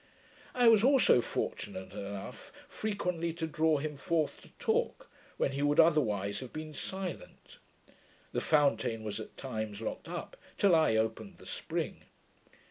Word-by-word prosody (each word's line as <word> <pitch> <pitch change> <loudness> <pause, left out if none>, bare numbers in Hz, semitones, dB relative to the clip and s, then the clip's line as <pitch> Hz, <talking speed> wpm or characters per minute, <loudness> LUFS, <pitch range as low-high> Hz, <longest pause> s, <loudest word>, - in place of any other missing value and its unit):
I 245 -1 +5
was 225 -2 +7
also 265 - +6
fortunate 95 -4 -4
enough 100 0 -7 0.2
frequently 180 -6 -2
to 165 0 -3
draw 160 -1 +2
him 150 0 -4
forth 160 0 -1
to - - -16
talk, 480 +2 -1 0.3
when - - +1
he 140 +1 -3
would 145 +2 +2
otherwise 105 - +3
have 130 - -8
been 155 0 -6
silent. 190 +3 -6 0.7
The - - -1
fountain 115 -7 +2
was 105 0 -4
at 110 - -9
times 110 -5 -4
locked 115 - -5
up, - - -6 0.2
till 200 -3 +4
I 155 -9 +4
opened 110 0 -1
the - - -15
spring. - - -3
150 Hz, 145 wpm, -32 LUFS, 110-170 Hz, 0.7 s, was